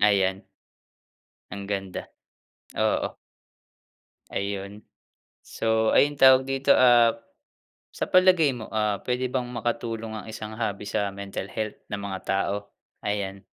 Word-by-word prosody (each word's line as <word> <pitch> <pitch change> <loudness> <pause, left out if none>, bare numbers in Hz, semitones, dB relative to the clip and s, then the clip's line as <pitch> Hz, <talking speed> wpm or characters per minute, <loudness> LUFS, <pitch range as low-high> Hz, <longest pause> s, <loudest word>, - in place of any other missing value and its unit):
Ayan. 95 -2 +3 1.1
Ang 100 +1 -6
ganda, 95 -2 -4 0.7
oo. - - 0 1.2
Ayun. 100 +1 -4 0.6
So, 110 0 +1
ayun 145 0 +4
tawag 130 -1 +7
dito, 135 +1 +3
ah, 120 -2 +6 0.8
sa - - -3
palagay 185 -5 +5
mo, 120 -4 -7
ah, 105 -2 +1
pwede 125 0 -1
bang 125 -2 -1
makatulong 115 -2 -3
ang 110 -1 -6
isang 110 0 -7
hobby 105 -3 -2
sa 100 0 -1
mental 100 -1 -5
health 110 +1 -4
ng 100 -1 -4
mga 95 -2 -4
tao? 100 +1 +1 0.5
Ayan. 100 -1 -3
110 Hz, 120 wpm, -26 LUFS, 100-125 Hz, 1.2 s, tawag